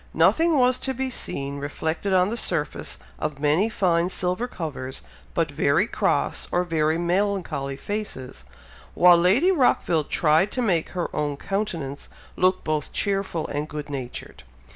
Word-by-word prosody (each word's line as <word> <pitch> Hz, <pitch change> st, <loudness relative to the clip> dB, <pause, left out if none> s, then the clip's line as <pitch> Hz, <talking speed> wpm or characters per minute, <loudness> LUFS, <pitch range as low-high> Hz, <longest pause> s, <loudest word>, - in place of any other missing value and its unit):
Nothing 255 Hz, -, +4 dB
was 255 Hz, -1 st, +3 dB
to 265 Hz, -1 st, -2 dB
be 260 Hz, +1 st, -2 dB
seen 140 Hz, -, -3 dB
reflected 160 Hz, +6 st, -2 dB
on 185 Hz, 0 st, +4 dB
the -, -, -1 dB
surface 170 Hz, -9 st, -2 dB, 0.2 s
of 145 Hz, -, -3 dB
many 155 Hz, +9 st, +2 dB
fine 175 Hz, -5 st, +1 dB
silver 185 Hz, +6 st, -2 dB
covers, 140 Hz, -, -6 dB, 0.3 s
but 165 Hz, -3 st, +1 dB
very 145 Hz, +6 st, +2 dB
cross, -, -, 0 dB
or 175 Hz, -, +2 dB
very 160 Hz, -2 st, +1 dB
melancholy 175 Hz, -6 st, -1 dB
faces; 205 Hz, -10 st, -5 dB, 0.5 s
while 175 Hz, 0 st, +7 dB
Lady 195 Hz, -, +4 dB
Rockville 210 Hz, -, +2 dB
tried 160 Hz, +7 st, +2 dB
to 255 Hz, -, -1 dB
make 175 Hz, -7 st, +1 dB
her 175 Hz, -, -2 dB
own 145 Hz, -1 st, -1 dB
countenance 165 Hz, -8 st, -3 dB, 0.3 s
look 185 Hz, 0 st, +2 dB
both 155 Hz, -2 st, -2 dB
cheerful 195 Hz, -5 st, -1 dB
and 150 Hz, +2 st, -3 dB
good 150 Hz, -1 st, -6 dB
natured. 130 Hz, -3 st, -6 dB
170 Hz, 145 wpm, -24 LUFS, 150-200 Hz, 0.5 s, while